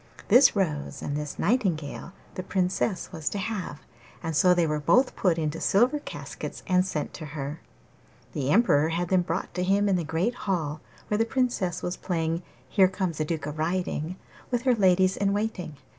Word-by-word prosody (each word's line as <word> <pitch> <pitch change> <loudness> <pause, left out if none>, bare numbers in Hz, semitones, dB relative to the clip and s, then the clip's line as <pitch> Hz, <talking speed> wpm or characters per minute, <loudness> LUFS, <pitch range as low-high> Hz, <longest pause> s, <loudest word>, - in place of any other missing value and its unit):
This 250 +4 +7
rose 150 -7 -2
and 145 - -2
this 150 0 -4
nightingale 175 - -1 0.2
the - - -4
Princess 185 0 -1
was 160 -4 -2
to - - -4
have, 190 -7 -4 0.4
and 165 -1 -2
so 180 +5 +5
they 175 -1 +3
were 150 -1 0
both 250 - +3
put 180 -4 +2
into 160 0 -2
silver 245 +9 +3
caskets - - -7
and 180 -2 +3
sent 175 -5 -3
to 155 - -7
her. 145 +3 -5 0.7
The 135 -2 -2
Emperor 160 -6 +4
had 170 +1 -1
them 185 -1 +4
brought 175 +1 -3
to 180 - -1
him 200 +2 +2
in 195 -2 +3
the 175 - -1
great 165 +9 0
hall, 160 -9 -2 0.3
where 210 - +1
the - - +5
Princess 235 -7 -1
was 180 0 -2
playing 165 -1 -1 0.3
'Here 190 +7 +5
comes 185 -4 -3
a 155 - +1
duke 160 -1 -3
a 150 - -3
riding' 165 +1 -2 0.3
with 245 -1 -1
her 255 -2 +4
ladies 190 -3 +3
in 200 0 +1
waiting. 205 -7 -3
180 Hz, 190 wpm, -27 LUFS, 160-200 Hz, 0.7 s, This